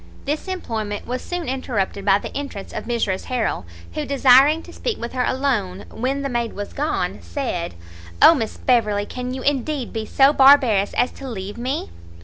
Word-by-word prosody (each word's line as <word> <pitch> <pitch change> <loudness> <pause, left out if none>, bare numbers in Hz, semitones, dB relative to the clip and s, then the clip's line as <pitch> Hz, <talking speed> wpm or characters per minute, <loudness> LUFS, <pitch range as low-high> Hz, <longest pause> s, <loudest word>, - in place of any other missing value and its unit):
This 300 +6 -2
employment 220 - -4
was 250 +1 -3
soon 355 -2 -4
interrupted 230 -7 -2
by 195 -1 +5
the - - -8
entrance 275 -9 -6
of - - -5
Mrs 225 -5 -1
Harrel, 235 - -2 0.3
who 150 - -2
desiring 275 +3 +5
to - - -13
speak 475 -3 -3
with 235 - -5
her 255 -1 0
alone, 235 -10 -1
when 270 +4 -2
the - - -1
maid 240 -3 -2
was 205 0 -6
gone, 295 +2 -2
said 205 - -4 0.4
"O - - +9
Miss 225 -8 -3
Beverley, 215 -5 +2
can 250 +3 -5
you 260 0 -5
indeed 280 -2 -1
be 220 -1 -4
so 275 +1 +5
barbarous 265 -8 +5
as 245 - +2
to 270 -1 -8
leave 205 -3 -6
me?" 240 - -3
250 Hz, 180 wpm, -21 LUFS, 210-275 Hz, 0.4 s, O